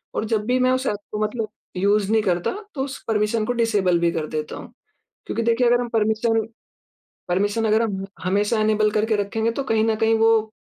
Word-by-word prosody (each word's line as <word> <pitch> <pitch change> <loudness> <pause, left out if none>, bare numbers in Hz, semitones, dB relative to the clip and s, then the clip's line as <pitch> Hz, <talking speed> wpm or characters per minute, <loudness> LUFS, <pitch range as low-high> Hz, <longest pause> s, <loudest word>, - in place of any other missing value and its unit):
और 220 - -1
जब 215 -1 -1
भी 250 +1 +1
मैं 255 0 +3
उस 260 +1 0
ऐप 210 - 0 0.2
को 210 - -3
मतलब 215 0 -2 0.3
यूज़ 200 +2 +2
नहीं 220 -1 +4
करता, 175 -3 0 0.2
तो 265 - -1
उस 275 0 -6
परमिशन 215 0 +1
को 245 - -1
डिसेबल 205 -7 +2
भी 170 0 +2
कर 160 -2 -3
देता 155 -1 -4
हूँ। - - -10 0.5
क्योंकि 230 - -2
देखिए 235 +1 +2
अगर 245 +1 +3
हम 240 - -4
परमिशन, 225 0 +1 0.8
परमिशन 205 +5 0
अगर 220 +2 +3
हम 195 -3 -2 0.2
हमेशा 205 +4 +1
इनेबल 215 0 +2
करके 215 +1 +1
रखेंगे, 220 +3 -1
तो 275 +4 -3
कहीं 220 -3 +1
न 225 -1 +2
कहीं 225 +1 +2
वो 225 -1 +3
220 Hz, 210 wpm, -22 LUFS, 205-230 Hz, 0.8 s, नहीं